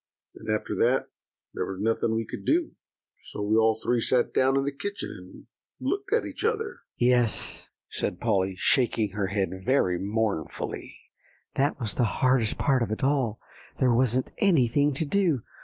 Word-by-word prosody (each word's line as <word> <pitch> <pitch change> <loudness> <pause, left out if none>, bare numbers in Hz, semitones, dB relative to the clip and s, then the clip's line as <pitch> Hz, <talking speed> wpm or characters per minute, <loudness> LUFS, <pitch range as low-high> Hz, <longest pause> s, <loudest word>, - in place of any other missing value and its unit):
And - - -10
after - - -1
that - - +2 0.4
there - - -2
was 95 -1 -5
nothing 110 +1 +1
we 115 0 -1
could - - -7
do; 330 0 +1 0.5
so 105 - -6
we 105 +1 +2
all 110 0 +4
three 120 +2 0
sat 125 +1 +2
down 135 +1 +3
in 135 - +2
the 140 - 0
kitchen, 200 +9 -5
and - - -12 0.4
looked 400 0 -2
at 460 - +2
each - - -6
other." 450 0 -1 0.2
"Yes," 120 -3 +1 0.2
said - - -3
Polly, 95 -1 +1
shaking 115 -2 +2
her 100 -1 -1
head 95 0 -1
very 95 -8 +2
mournfully, 105 -5 -3 0.6
"that 140 +1 +1
was 115 -5 -2
the 125 - +1
hardest 130 -4 +2
part 135 -3 +2
of 115 - 0
it 110 - -3
all; 130 -5 +1 0.4
there 125 -3 +4
wasn't 125 +1 +1
anything 145 - +3
to 160 - -1
do. 165 - +1
125 Hz, 170 wpm, -27 LUFS, 110-140 Hz, 0.6 s, all